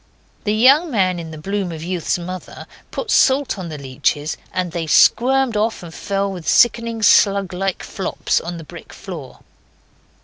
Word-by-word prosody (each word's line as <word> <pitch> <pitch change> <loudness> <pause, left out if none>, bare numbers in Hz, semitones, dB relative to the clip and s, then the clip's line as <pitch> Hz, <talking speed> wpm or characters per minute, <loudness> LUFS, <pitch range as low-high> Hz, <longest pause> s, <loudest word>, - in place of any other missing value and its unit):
The 210 0 +1
young 275 +9 +5
man 185 - +1
in 165 -1 -7
the 155 - -9
bloom 195 +3 -3
of 160 -1 -7
youth's 180 -1 -1
mother 180 +1 -8 0.2
put 450 - -4
salt 265 -5 +3
on 175 -2 -6
the 155 - -6
leeches, 140 +3 -2 0.2
and 180 -2 -2
they 165 -1 -4
squirmed 255 +7 +4
off, 215 -1 -1
and 165 -1 -10
fell 200 +2 -2
with 180 -4 -8
sickening, 230 -1 +2
slug 200 -3 +4
like 190 +1 -2
flops 190 - -2
on 170 +1 -6
the 165 - -8
brick 170 +2 -12
floor. 165 -9 -9
190 Hz, 170 wpm, -19 LUFS, 170-220 Hz, 0.2 s, young